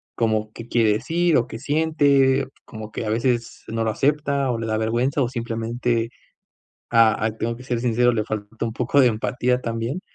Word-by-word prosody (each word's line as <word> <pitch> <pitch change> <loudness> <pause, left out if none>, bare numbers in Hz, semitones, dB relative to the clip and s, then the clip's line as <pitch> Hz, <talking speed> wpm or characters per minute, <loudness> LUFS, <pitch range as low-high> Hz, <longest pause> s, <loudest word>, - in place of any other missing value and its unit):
como 110 -1 0
qué 115 0 -9
quiere 115 -3 +3
decir, 165 +9 +1
o 120 - +2
qué 115 - -8
siente, 140 -3 +2 0.2
como 110 -1 -9
que 110 - -4
a - - -2
veces 120 +1 -1
no 115 0 -2
lo 110 - +1
acepta, 140 +1 0
o 115 - -1
le 115 - -4
da 110 - 0
vergüenza, 120 +6 0
o 125 - +2
simplemente, 115 -1 -2 0.8
ah, 115 -1 +5
aquí 110 0 -3
tengo 115 0 -1
que 125 - -11
ser 120 -2 -1
sincero, 120 0 +2
le 110 -2 0
falta 110 +1 -5
un 115 - -2
poco 125 +4 0
de 125 - +6
empatía 125 +3 0
también. 115 +8 -3
115 Hz, 195 wpm, -23 LUFS, 115-130 Hz, 0.8 s, de